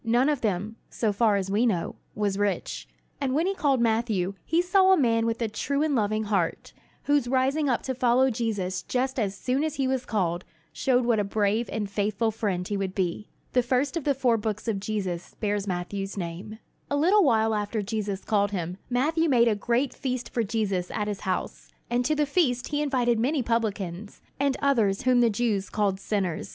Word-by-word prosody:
None 240 +5 +3
of 290 -4 0
them, 210 +1 -2
so 215 -3 -1
far 215 0 +3
as 195 -1 -2
we 220 +5 +3
know, 180 -7 -1 0.2
was 205 -2 0
rich. 205 -1 -2 0.3
And 265 -1 0
when 320 +3 +2
he 390 - +1
called 285 -8 +1
Matthew 220 -5 +1
he 325 - +1
saw 375 +2 +4
a 380 - +6
man 230 -4 +2
with 230 0 -1
a - - +1
true 280 +7 -1
and 310 -2 +1
loving 215 -1 +1
heart, 195 -6 -1 0.3
whose 285 -4 +2
rising 270 +3 +1
up 245 - 0
to 260 - -2
follow 255 +1 +3
Jesus 200 -6 -2
just 260 +6 -1
as 200 -3 -1
soon 260 +6 0
as 310 -1 -2
he 270 -3 0
was 260 -1 0
called 185 -7 -1 0.3
showed 250 -2 +2
what 235 -3 +2
a - - +2
brave 210 +3 0
and 210 -2 -2
faithful 205 +2 0
friend 195 -5 -2
he 205 - -2
would 190 -1 -3
be. 190 +2 -2 0.2
The 250 - +4
first 255 +5 0
of 335 - -2
the 280 -1 +1
four 250 -3 +2
books 215 0 -3
about 215 -3 0
Jesus 195 -4 -4
bears 205 -1 -1
Matthew's 195 +2 -3
name. 180 +4 -5 0.3
A 285 - 0
little 370 +8 +4
while 225 -6 +3
after 210 0 -1
Jesus 205 -2 -3
called 205 -2 +2
him, 180 -2 -4
Matthew 310 +6 +1
made 240 -3 +5
a 225 - +4
great 240 +5 0
feast 255 -2 -4
for 240 - +1
Jesus 200 -5 -1
at 210 -1 -2
his 205 -2 -3
house; 185 -1 -3 0.2
and 245 +1 +2
to 310 - +2
the 300 0 +2
feast 270 -5 +1
he 295 0 0
invited 245 -5 +1
many 265 +3 +1
publicans, 210 -4 -2 0.2
and 280 -1 +1
others 225 -8 +2
whom 255 -1 +4
the 235 - +4
Jews 210 -3 -1
called 200 -3 0
sinners. 195 -5 -2
225 Hz, 205 wpm, -26 LUFS, 200-260 Hz, 0.3 s, a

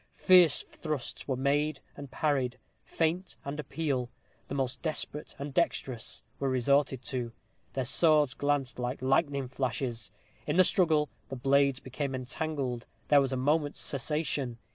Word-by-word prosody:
Fierce 180 -5 +6
thrusts 150 -6 -4
were 135 - 0
made 145 +3 +1 0.2
and 140 -1 -8
parried. 135 -4 0 0.2
Feint 170 +3 -1
and 140 +2 -4
appeal, 140 -5 -2 0.4
the 140 - -4
most 135 -2 -2
desperate 155 -2 -4
and 140 0 -6
dexterous, 130 -7 -1 0.2
were 140 - 0
resorted 135 +1 +2
to. 120 -1 -3 0.4
Their 130 -1 -1
swords 150 -1 +4
glanced 145 -3 -1
like 125 +1 -3
lightning 140 0 +2
flashes. 125 -2 -2 0.4
In - - 0
the 185 - +8
struggle, 160 -5 +3 0.2
the 135 - -4
blades 135 +1 +3
became 135 +1 -4
entangled. 130 -1 -3 0.2
There 145 -1 +7
was 135 -1 0
a 130 - 0
moment's 145 +3 +1
cessation. 140 -3 -1
140 Hz, 140 wpm, -30 LUFS, 130-150 Hz, 0.4 s, the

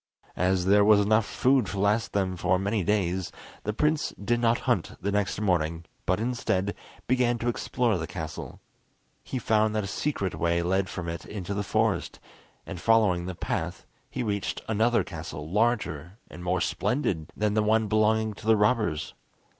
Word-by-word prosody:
As 90 0 +1
there 100 +2 +5
was 105 0 +6
enough 110 +1 +3
food 130 -4 +2
to 100 - -4
last 105 +3 +1
them 95 -2 0
for 90 +1 +1
many 100 +1 0
days, 95 -2 0 0.3
the 105 - 0
prince 150 +7 +1
did 120 +4 -1
not 115 0 +2
hunt 120 -10 0
the 100 +3 -2
next 100 -1 0
morning, 85 -5 0 0.2
but, 95 +2 +2
instead, 110 -5 -1 0.3
began 125 -1 +2
to 120 - -4
explore 120 -1 0
the 80 - -4
castle. 80 -4 -7 0.6
He 130 - -4
found 110 -2 +2
that 105 - 0
a - - -4
secret 100 -3 -2
way 85 0 0
led 95 +1 +1
from 90 -2 -5
it 85 0 -4
into 100 -1 -5
the 100 - -1
forest; 110 +1 0 0.5
and 90 - -7
following 105 -6 +3
the 95 - -4
path, - - -3 0.2
he - - -3
reached 100 -3 -2
another 115 +2 +2
castle 75 0 -7
larger 100 -4 0
and 90 - -9
more 90 0 0
splendid 110 - -1
than 105 -1 +1
the 110 - +3
one 110 +1 +2
belonging 110 +1 +2
to 110 - -11
the 110 -1 +5
robbers. 105 -8 +1
105 Hz, 175 wpm, -27 LUFS, 90-110 Hz, 0.6 s, was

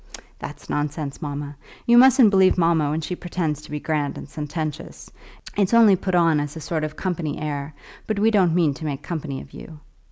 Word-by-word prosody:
"That's - - -9
nonsense, 145 0 -3
mamma. 145 -1 -5 0.3
You 235 - +5
mustn't 255 -4 +7
believe 190 -2 +4
mamma 165 -4 +2
when 155 +2 -1
she 180 +3 -4
pretends 165 -4 -3
to - - -14
be 150 - -4
grand 150 -2 -2
and - - -8
sententious. 150 0 -6 0.4
It's 205 +2 +2
only 220 -4 +7
put 185 0 -2
on 165 -3 +4
as 145 +1 -4
a - - -6
sort 155 0 -3
of 155 0 -4
company 170 -5 -3
air, 145 -1 -4 0.3
but 215 - -1
we 220 +2 +3
don't 185 -6 +3
mean 165 -5 +3
to 155 - -8
make 145 -1 -4
company 150 -5 -5
of - - -15
you." 160 - -10
160 Hz, 200 wpm, -23 LUFS, 145-180 Hz, 0.4 s, mustn't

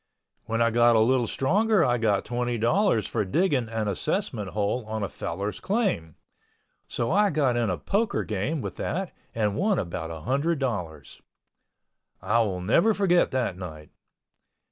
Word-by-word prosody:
When 115 +2 +1
I 115 - +2
got 120 0 +4
a - - +5
little 120 +1 +3
stronger 200 - +2
I 120 -1 +1
got 105 -3 +1
twenty 120 0 -2
dollars 120 - +2
for 110 - -1
digging 130 - +1
an 110 -2 -2
assessment 115 - -2
hole 105 +5 -1
on 110 -1 -3
a - - 0
fellow's 100 +2 -4
claim, 190 - -1 0.7
so 120 - -2
I 205 +3 +4
got 140 -7 +1
in 120 -3 +1
a 90 - -1
poker 210 +2 0
game 110 +9 -2
with - - -6
that 190 +2 -3 0.2
and 105 -3 0
won 200 0 +1
about 85 -3 -3
a 80 -1 -7
hundred 140 - 0
dollars. 90 - -4 1.0
I 105 +5 +1
will 95 -5 0
never 170 - +3
forget 180 -3 +3
that 120 -8 -2
night. 80 -4 -9
120 Hz, 165 wpm, -26 LUFS, 100-160 Hz, 1.0 s, a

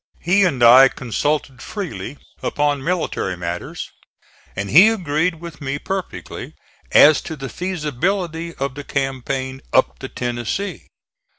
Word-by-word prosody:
He 195 +4 +3
and 135 -9 +1
I 125 +3 +9
consulted 135 +1 -2
freely 195 -8 -6 0.2
upon 145 -2 0
military 165 - -1
matters 85 0 -5 0.6
and 100 0 -3
he 185 - +8
agreed 170 -5 0
with 165 -2 -10
me 140 0 -2
perfectly 190 +5 -6 0.4
as 150 0 +7
to 160 - -6
the 135 -3 -6
feasibility 170 0 -2
of 135 -1 -3
the 145 +1 -7
campaign 135 -1 -3
up 130 - +2
the 130 - -6
Tennessee. 120 - -3
145 Hz, 125 wpm, -20 LUFS, 130-170 Hz, 0.6 s, I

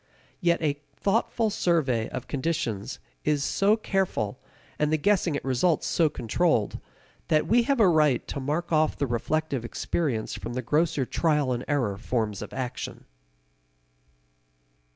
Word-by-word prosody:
Yet 170 -2 +2
a 145 -1 0
thoughtful 220 +1 +1
survey 140 - +1
of - - -6
conditions 130 -7 -2 0.3
is 150 -2 +1
so 205 +7 +3
careful, 190 - -1 0.4
and 150 0 +2
the 155 - +3
guessing 180 -3 +2
at - - -8
results 135 +5 +2
so 165 -3 +2
controlled, 125 - 0 0.5
that 155 -1 +3
we 240 +2 +4
have 275 -3 +3
a 210 - +6
right 150 -7 +3
to 140 - -3
mark 155 +6 -2
off 155 -1 +2
the 140 - 0
reflective 135 +2 -1
experience 120 -1 -2
from 120 - -5
the 130 +1 -3
grosser 150 +1 +1
trial 150 -3 +1
and 120 +1 -3
error 125 -10 0
forms 110 -4 -2
of - - -7
action. 125 -2 -5
150 Hz, 145 wpm, -27 LUFS, 125-170 Hz, 0.5 s, a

